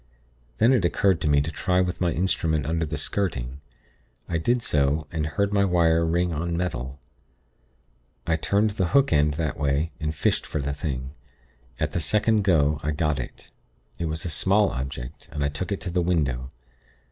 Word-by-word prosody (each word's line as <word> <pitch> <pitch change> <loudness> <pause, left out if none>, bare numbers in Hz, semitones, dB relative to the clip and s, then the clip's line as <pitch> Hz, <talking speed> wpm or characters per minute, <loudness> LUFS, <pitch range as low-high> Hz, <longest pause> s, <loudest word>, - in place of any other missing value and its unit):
Then 120 - +5
it 120 -7 +2
occurred 95 +1 +2
to 75 - +1
me 70 -1 +4
to 75 +3 -3
try 90 +3 +1
with 90 0 -1
my 85 -2 +2
instrument 80 -4 0
under 80 +1 -1
the 75 0 -3
skirting. 70 -6 -2 0.7
I 85 - -1
did 120 +8 +1
so, 75 +1 +1
and 80 -3 -1
heard 100 +7 0
my 100 -1 +4
wire 85 -3 +3
ring 85 +1 +1
on 85 +2 -2
metal. 70 -6 -3 1.3
I 80 - +2
turned 100 +5 +1
the 95 -3 0
hook 140 -7 +4
end 75 0 +3
that 80 -2 -2
way, 70 +3 +1
and 75 -1 -2
fished - - +1
for 75 - -3
the 70 0 -2
thing. 70 -3 -4 0.7
At - - 0
the - - -1
second 105 +6 +2
go, 75 -6 +3
I 75 - -2
got 75 -1 0
it. - - -8 0.5
It 85 - -1
was 80 +2 -3
a - - -1
small 100 +7 +3
object, 65 -2 -6
and 75 - -2
I 70 - +1
took 90 +8 -5
it 100 - -1
to 90 - -4
the 90 +1 +1
window. 70 -8 0
80 Hz, 190 wpm, -25 LUFS, 75-90 Hz, 1.3 s, Then